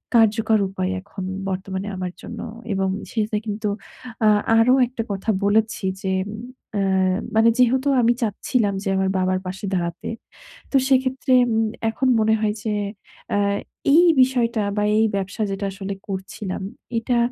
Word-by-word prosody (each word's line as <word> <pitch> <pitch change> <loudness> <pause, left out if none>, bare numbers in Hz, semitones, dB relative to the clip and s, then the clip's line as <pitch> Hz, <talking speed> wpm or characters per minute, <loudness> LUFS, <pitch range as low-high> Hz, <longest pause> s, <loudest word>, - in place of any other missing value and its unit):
কার্যকর 220 -1 +4
উপায় 185 -1 -2
এখন 195 0 -8 0.3
বর্তমানে 190 +1 -4
আমার 180 -1 -4
জন্য। 230 - -8 0.3
এবং 195 0 0 0.2
সেটা 215 -1 0
কিন্তু 210 0 -3 0.6
আ - - +6 0.3
আরো 240 +3 +5
একটা 235 -2 -4
কথা 195 +3 -3 0.2
বলেছি 215 +1 +1 0.2
যে 190 - 0 0.6
অ্যা 190 -1 +2 0.2
মানে 225 +1 +6
যেহেতু 255 +3 +3
আমি 235 0 +4
চাচ্ছিলাম 215 0 0
যে 195 - -1
আমার 190 0 +1
বাবার 185 0 +1
পাশে 190 +3 -5
দাঁড়াতে। 170 -1 -3 0.6
তো - - -2
সেক্ষেত্রে 260 0 +2 0.2
উম 225 0 +2 0.3
এখন 260 +4 0
মনে 220 0 +3
হয় 210 -1 +1
যে 220 - -1 0.6
আ - - +2 0.6
এই 340 - +7 0.2
বিষয়টা 245 -3 +2 0.2
বা 210 - +2
এই 220 - +4
ব্যবসা 195 +2 -3
যেটা 195 +1 -3
আসলে 195 0 -5
করছিলাম, 190 0 -5 0.4
এটা 240 +1 0
210 Hz, 145 wpm, -22 LUFS, 190-230 Hz, 0.6 s, এই